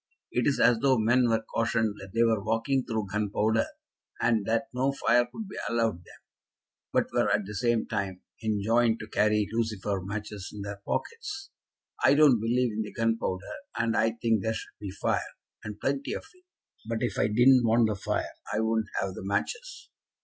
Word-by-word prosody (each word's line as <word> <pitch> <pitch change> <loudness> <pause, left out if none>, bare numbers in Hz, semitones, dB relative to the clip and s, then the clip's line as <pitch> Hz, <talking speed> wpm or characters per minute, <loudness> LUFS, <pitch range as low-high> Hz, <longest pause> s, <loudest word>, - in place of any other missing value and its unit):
It 125 - +1
is 140 - +2
as 120 -2 +5
though 130 0 +3
men 120 +2 +3
were 115 0 +1
cautioned 115 -2 +1
that 95 0 -9
they 115 - +4
were 110 -3 +2
walking 115 +5 +1
through 110 -5 -3
gunpowder, 105 +2 +1 0.5
and 110 -4 +2
that 115 +4 +1
no 130 +2 +1
fire 120 -3 +3
could 220 -2 -6
be 195 - -7
allowed 115 -4 +1
them, 90 - -16 0.7
but - - +1
were - - +2
at 105 - +1
the 105 - -7
same 120 +1 +1
time 100 -4 -3 0.2
enjoined 110 +2 +2
to 105 - -7
carry 105 -1 +2
lucifer 105 -4 -1
matches 105 0 -5
in 105 -1 -7
their 100 0 -6
pockets. 415 -9 -4 0.5
I 135 +2 +6
don't 145 -6 +6
believe 120 +2 +1
in 110 - -2
the 105 - -5
gunpowder, 115 -5 -1 0.3
and 115 0 +1
I 115 0 +2
think 115 -2 +1
there 110 +3 -1
should - - -7
be 105 -2 -5
fire, 95 - -2 0.3
and 105 -1 -7
plenty 140 0 -1
of - - -5
it; 365 0 -26 0.4
but 115 -1 -1
if - - -1
I - - +3
didn't 120 +4 +5
want 115 0 +4
the 105 - -1
fire 95 - -2 0.2
I 105 - 0
wouldn't 110 -1 0
have 95 - -2
the - - -8
matches." 465 - -3
115 Hz, 190 wpm, -28 LUFS, 105-120 Hz, 0.7 s, I